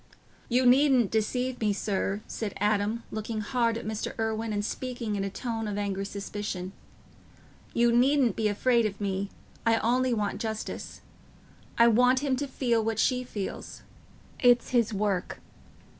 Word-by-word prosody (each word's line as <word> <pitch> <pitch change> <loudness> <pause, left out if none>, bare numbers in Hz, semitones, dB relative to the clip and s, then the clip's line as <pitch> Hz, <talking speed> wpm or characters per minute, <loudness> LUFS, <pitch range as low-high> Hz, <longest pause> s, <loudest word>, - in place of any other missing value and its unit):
"You 250 +1 +3
needn't 255 -3 +5
deceive 250 +3 -1
me, 210 -2 +2
sir," 200 0 -1
said 215 -3 -5
Adam, 210 +2 +1
looking 215 0 -3
hard 230 0 0
at 230 - -7
Mr. 215 0 -4
Irwine 220 0 -1
and 205 0 -1
speaking 240 -3 -3
in 195 - -1
a 195 - -2
tone 225 +2 -4
of 205 -1 -3
angry 200 -1 -2
suspicion. 200 -2 -5 1.0
"You 235 0 +4
needn't 255 -2 +3
be 220 -1 +1
afraid 230 +2 +2
of 200 -1 -8
me. 200 -1 -2 0.3
I 225 0 +3
only 250 +3 +1
want 210 -4 -1
justice. 220 -1 -5 0.8
I 235 - +7
want 250 +3 +4
him 275 -3 +1
to 285 - -2
feel 240 -4 0
what 225 -1 -1
she 250 +2 +2
feels. 205 -6 -6 0.6
It's 245 -2 +4
his 235 -3 +2
work... 200 -3 -1
225 Hz, 155 wpm, -28 LUFS, 205-245 Hz, 1.0 s, I